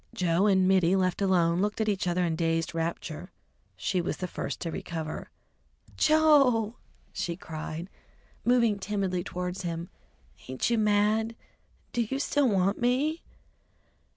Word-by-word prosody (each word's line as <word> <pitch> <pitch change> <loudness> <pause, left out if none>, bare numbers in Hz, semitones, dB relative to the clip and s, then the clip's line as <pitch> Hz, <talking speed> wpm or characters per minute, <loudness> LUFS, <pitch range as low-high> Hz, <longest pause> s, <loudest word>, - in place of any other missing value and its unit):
Joe 180 +2 +2
and 190 -2 +4
Mittie, 185 -1 +4
left 185 0 0
alone, 175 -3 +3
looked 210 +2 -1
at 220 - 0
each 195 -3 0
other 175 0 +1
in 165 -2 0
dazed 165 0 0
rapture. 165 +1 -4 0.5
She 185 - 0
was 170 - -3
the 180 - -3
first - - -5
to 165 - -3
recover. 160 -1 -5 0.7
"Joe!" 275 -8 +4 0.4
she 175 -3 -2
cried, 160 0 -6 0.6
moving 235 -4 +3
timidly 190 -3 -1
towards 180 +1 -4
him, 170 -1 -4 0.6
"ain't 130 - -1
you 235 - +2
mad? 215 +2 +2 0.6
Do 240 - +1
you 235 +4 -2
still 285 -1 +2
want 195 +1 +1
me?" 275 +7 +1
190 Hz, 140 wpm, -28 LUFS, 170-220 Hz, 0.7 s, and